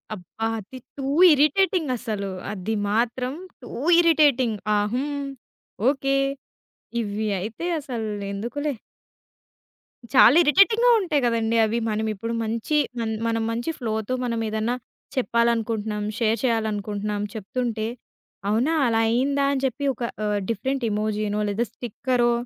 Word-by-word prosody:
అబ్బా! 200 +4 -6
అది 220 +6 -10 0.2
two 275 - -4 0.3
irritating 305 +2 +3
అసలు. 210 -5 -4 0.2
అది 210 +2 -3
మాత్రం 245 +4 0 0.3
టూ 245 - -10 0.3
ఇరిటేటింగ్. 290 -9 +4 0.2
ఆహ్, 205 0 +1
హ్మ్. 285 +2 -2 0.7
ఓకె. 275 0 +1 0.8
ఇవి 215 0 -2
అయితే 220 - -5
అసలు 240 -6 -4 0.2
ఎందుకులే. 280 +9 -3 1.4
చాలా 260 0 +8
ఇరిటేటింగ్‌గా 395 +9 +5
ఉంటాయి 310 -7 +1
కదండీ 230 -1 +1
అవి. 220 +2 -1
మనం 220 0 -1
ఇప్పుడు 230 +3 -4
మంచి 225 +6 -2 0.2
మన 225 -1 -1 0.2
మనం 225 0 0
మంచి 235 +6 -3
ఫ్లోతో 220 -1 -2
మనం 230 -1 -1
ఏదన్నా 220 +3 -1 0.4
చెప్పాలనుకుంటున్నాం, 230 -4 0
షేర్ 225 -1 +2
చేయాలనుకుంటున్నాం, 210 -3 -1
చెప్తుంటే, 225 +1 -3 0.6
అవునా! 240 +9 +2
అలా 225 -2 +2
అయ్యిందా! 275 +5 +1
అని 270 -1 -2
చెప్పి 265 +2 -2
ఒక 245 - -7 0.2
ఆహ్, 210 -1 0
డిఫరెంట్ 260 +4 -1
ఎమోజీనో 210 0 -1
లేదా 215 +4 0
స్టిక్కరో 240 +1 0
230 Hz, 120 wpm, -24 LUFS, 215-265 Hz, 1.4 s, చాలా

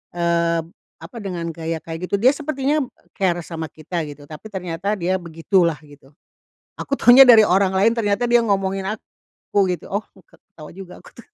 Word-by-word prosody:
eee, 170 -1 +1 0.4
apa, 240 - -12
dengan 180 -4 -5
gaya 165 0 -4
kayak 165 +2 -6
gitu, - - +1
dia 250 +7 +4
sepertinya, 290 0 -1 0.3
care 175 -3 -1
sama 160 -2 -6
kita 160 +4 -5
gitu 145 0 -12
tapi 155 +8 -11
ternyata 190 +1 -3
dia 185 +1 -1
begitulah 170 0 0
gitu, 145 -2 -18 0.7
aku 280 - -4
taunya 245 +3 +8
dari 230 -4 +7
orang 190 +1 +2
lain 200 +5 +2
ternyata 220 +1 0
dia 240 0 +4
ngomongin 195 -2 -1
aku 200 -2 -4
gitu. 180 - -6
Oh, 200 +2 -1 0.2
ke - - -22
ketawa 155 -2 -14
juga 190 -2 -10
aku - - -17
tuh. 235 - -15
190 Hz, 175 wpm, -20 LUFS, 170-215 Hz, 0.7 s, taunya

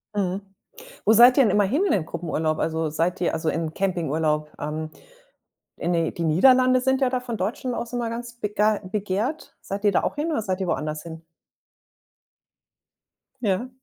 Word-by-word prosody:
Mhm. 195 -1 -1 0.6
Wo 220 - +5
seid 240 +3 +7
ihr 270 - +7
denn 215 - +3
immer 205 +1 +3
hin 285 - +1
in 385 - +2
den 165 -5 0
Gruppenurlaub? 160 -2 -2
Also, 160 -1 -1
seid 165 +4 -1
ihr 175 - +1
also, 160 0 -2
in 165 - 0
'n 155 - -12
Campingurlaub? 160 -5 -1
Ähm, 155 +1 -4 0.9
in 175 - -1
die 165 -2 0
die 170 - -3
Niederlande 255 +10 +5
sind 265 +1 +1
ja 260 -2 +2
da 255 -1 -1
von 240 -2 -5
Deutschen 240 +6 -3
aus 235 0 -5
immer 240 -1 -2
ganz 235 +1 -6
begei 210 0 +1
begehrt. 205 +9 -3
Seid 200 +2 -6
ihr 205 - +4
da - - +2
auch - - -1
hin 305 +3 -1
oder 225 - 0
seid 190 -2 -2
ihr 190 - -1
woanders 155 0 -2
hin? 165 -1 -9 2.2
Ja. 215 +3 0
195 Hz, 185 wpm, -24 LUFS, 165-240 Hz, 2.2 s, seid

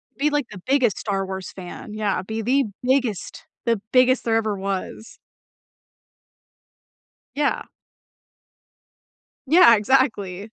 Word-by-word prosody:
Be, 295 +2 +1
like, 290 -4 -1
the 185 -3 -10
biggest 260 -6 +2
Star 195 -2 -2
Wars 190 0 -6
fan. 185 +3 -9
Yeah, 210 -2 -1
be 220 +4 -5
the 265 +4 +2 0.2
biggest 250 -7 -1 0.2
the 230 -4 +1
biggest 255 0 +4
there 225 -1 +1
ever 215 -2 -1
was. 195 +3 -5 2.2
Yeah. 290 0 0 1.8
Yeah, 325 -6 +7
exactly. 210 -5 +1
225 Hz, 110 wpm, -22 LUFS, 200-260 Hz, 2.2 s, Yeah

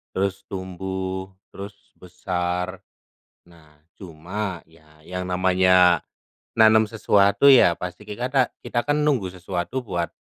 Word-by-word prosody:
terus 95 0 -1
tumbuh, 95 0 -5 0.2
terus 100 0 -11
besar. 90 0 -4 0.7
Nah, 80 -3 -21 0.2
cuma 90 +2 -6
ya 80 -1 -23
yang 90 0 -5
namanya 90 -1 +3 0.5
nanem 110 0 +5
sesuatu 105 +3 +3
ya 125 -10 +6
pasti 90 +4 -8
kikata 125 +4 -1
kita 120 -1 -2
kan 145 +1 +1
nunggu 125 -12 0
sesuatu 90 +7 -4
buat, 85 -8 -4
95 Hz, 110 wpm, -23 LUFS, 90-105 Hz, 0.7 s, ya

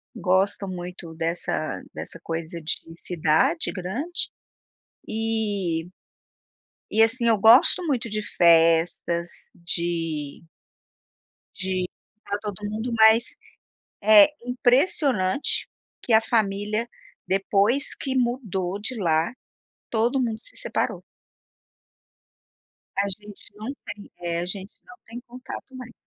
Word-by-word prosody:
gostam 190 +1 +1
muito 175 -2 -7
dessa 165 -1 -2
dessa - - -4
coisa 165 +1 -4
de 155 - 0 0.2
cidade 175 - +1
grande, 225 - -4 0.8
e 205 -7 -1 1.0
e 220 - +4
assim, 235 +2 +4
eu 225 - +5
gosto 225 - +6
muito 255 -7 -1
de 215 0 -2
festas, 170 -1 +3 0.3
de 165 -3 -3 1.1
de 185 -1 -1 0.3
estar 205 -2 -4
todo 205 -1 -5
mundo, 220 +3 -3
mas 220 +1 +7 0.8
é 210 -1 +9 0.2
impressionante 250 - +2 0.3
que 235 - -1
a 220 - +7
família 215 0 0 0.4
depois 200 +8 +2
que 265 -2 -4
mudou 210 -7 -1
de 220 +5 -1
lá 165 0 +1 0.6
todo 235 +4 +1
mundo 225 -3 -1
se - - -14
separou. - - -2 2.0
A 200 - -1
gente 205 +1 -9
não 220 +6 -5
tem, 205 -1 -9
eh, 170 -1 -2
a 175 - -2
gente 190 +2 -7
não 245 - -14
tem 230 +2 -7
contato 255 +2 -10
mais. 245 -2 -9
205 Hz, 110 wpm, -24 LUFS, 175-235 Hz, 2.0 s, é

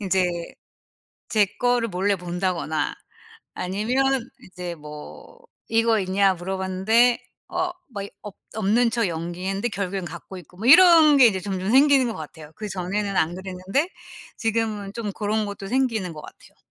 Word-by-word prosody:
인제 190 -2 +1 1.0
제 215 -2 +4
거를 245 -1 +2
몰래 195 +2 +1
본다거나 175 -3 -2 0.6
아니면 215 +9 0 0.4
이제 180 -1 -7
뭐 150 - -11 0.3
"이거 225 -1 +2
있냐?" 195 +1 +2
물어봤는데 190 +6 +2 0.3
어 365 -1 -1 0.2
뭐 200 -2 -4
이 200 - -7
없 210 -3 -9 0.2
없는 220 +3 +2
척 230 -3 +1
연기했는데 180 +6 -3
결국엔 195 -2 -3
갖고 175 +3 -9
있고 180 +1 -14
뭐 220 +5 -3
이런 325 -1 +8
게 255 -3 +8
이제 195 -4 0
점점 190 +1 -3
생기는 275 0 +5
것 230 - -4
같아요. 155 0 -10
그전에는 200 0 -3
안 160 +2 +2
그랬는데 190 - -2 0.5
지금은 220 -3 -1
좀 215 -3 -4
고런 215 +1 -1
것도 200 -1 -7
생기는 225 -7 0
것 155 - -9
같아요. - - -15
200 Hz, 300 characters per minute, -24 LUFS, 185-230 Hz, 1.0 s, 이런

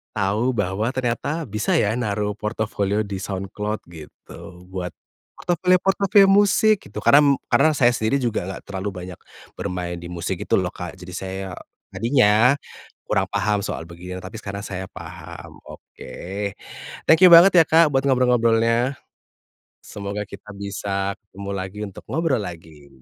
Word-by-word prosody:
tahu 105 +2 0
bahwa 105 +2 -1
ternyata 130 +5 -2
bisa 105 0 -2
ya, 105 +2 +1
naruh 105 -3 -1
portofolio 105 -1 -1
di 100 - -5
Soundcloud, 105 +2 -4
gitu. 80 -3 -13 0.4
Buat, 90 -1 -4 0.5
portofolio-portofolio 190 +3 +3
musik 205 +1 +4
gitu - - -7
karena 140 - +6
m 140 - +5 0.2
karena 155 - +4
saya 130 -4 +4
sendiri 115 +5 0
juga 115 -7 -1
enggak 95 +1 -6
terlalu 95 +1 -4
banyak 90 -1 -8 0.4
bermain 90 -1 -4
di 85 - -8
musik, 90 +2 -3
gitu - - +1
loh, 90 -1 -2
Kak, 90 -1 -7
jadi 90 0 -10
saya 95 0 -5 0.5
tadinya 115 0 +4 0.5
kurang - - +1
paham 105 -1 0
soal - - -4
begini 90 +2 -9
ya, - - -10
tapi 100 +4 -8
sekarang 100 -1 -6
saya 95 -2 -5
paham, - - -10
oke. - - -12 1.0
Thank 160 - +6
you - - +7
banget 175 +3 +9
ya, 165 - +8
Kak, 160 -1 +5
buat 135 0 +1
ngobrol-ngobrolnya. 120 -1 +2 0.9
Semoga 100 0 -5
kita 100 +1 -12
bisa 100 0 -3
ketemu 100 -1 -10
lagi 95 +2 -6
untuk 100 - -11
ngobrol 160 -6 0
lagi. 80 -6 -10
105 Hz, 150 wpm, -22 LUFS, 95-130 Hz, 1.0 s, banget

